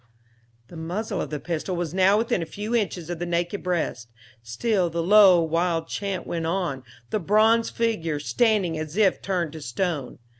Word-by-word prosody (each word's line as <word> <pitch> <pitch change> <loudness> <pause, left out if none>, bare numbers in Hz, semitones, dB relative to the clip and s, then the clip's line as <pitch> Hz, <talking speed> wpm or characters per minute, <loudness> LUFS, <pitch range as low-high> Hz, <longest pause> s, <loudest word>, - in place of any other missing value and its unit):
The - - -12
muzzle 175 +7 -3
of - - -4
the 150 - -4
pistol 170 +3 -3
was 175 -2 -3
now 190 +2 +4
within 225 -5 0
a 165 - -4
few 210 +6 -5
inches 180 -6 -2
of 175 - -5
the 175 - -2
naked 175 +3 -1
breast; 165 -10 -2 0.3
still 175 - 0
the 165 0 -2
low, 195 -1 +7
wild 165 0 0
chant 195 -3 -3
went 165 -1 -3
on, 170 -7 -2 0.3
the 215 - 0
bronze 220 +4 +3
figure 170 -10 -1
standing 195 -1 +1
as 155 +3 -6
if 200 -4 +3
turned 175 -5 -2
to 160 - -8
stone. 145 +1 -3
175 Hz, 180 wpm, -24 LUFS, 165-205 Hz, 0.3 s, low